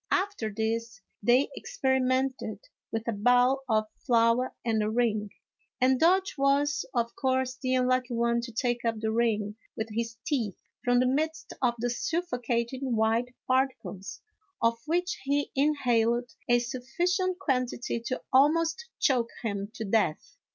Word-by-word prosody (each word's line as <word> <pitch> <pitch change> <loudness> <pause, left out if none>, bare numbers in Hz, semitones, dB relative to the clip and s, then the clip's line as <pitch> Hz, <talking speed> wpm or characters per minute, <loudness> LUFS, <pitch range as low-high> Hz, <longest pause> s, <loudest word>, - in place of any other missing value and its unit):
After 375 - 0
this, 225 +1 -2 0.2
they 245 +6 +3
experimented 265 - 0 0.3
with 225 +1 -3
a - - +2
bowl 245 +5 +3
of 215 -1 +3 0.2
flour 235 0 +3
and 220 -2 +1
a 210 - 0
ring, 215 -2 0 0.5
and 260 0 +3
Dodge 365 -1 +3
was, 280 +2 +2
of 235 -1 -1
course, 260 -1 0
the 260 0 0
unlucky 255 -1 +1
one 235 0 +1
to 235 0 -7
take 240 +1 -1
up 230 -1 +1
the 220 0 -1
ring 220 -2 0 0.2
with 220 +1 -3
his 230 +1 -3
teeth 235 - -1 0.3
from 245 0 +3
the - - +3
midst 315 +5 -1
of 245 -2 +2
the 240 +1 -1
suffocating 245 -4 -1
white 225 +3 +1
particles, 255 -7 -1 0.4
of 230 0 +2
which 350 +3 0
he 285 +1 0
inhaled 245 -4 +2 0.2
a 240 - +6
sufficient 345 +10 -1
quantity 255 -7 -1
to 255 +3 -4
almost 330 - +3
choke 245 -5 +2
him 200 -2 -2
to 225 - -4
death. 205 -6 0
245 Hz, 145 wpm, -28 LUFS, 230-270 Hz, 0.5 s, a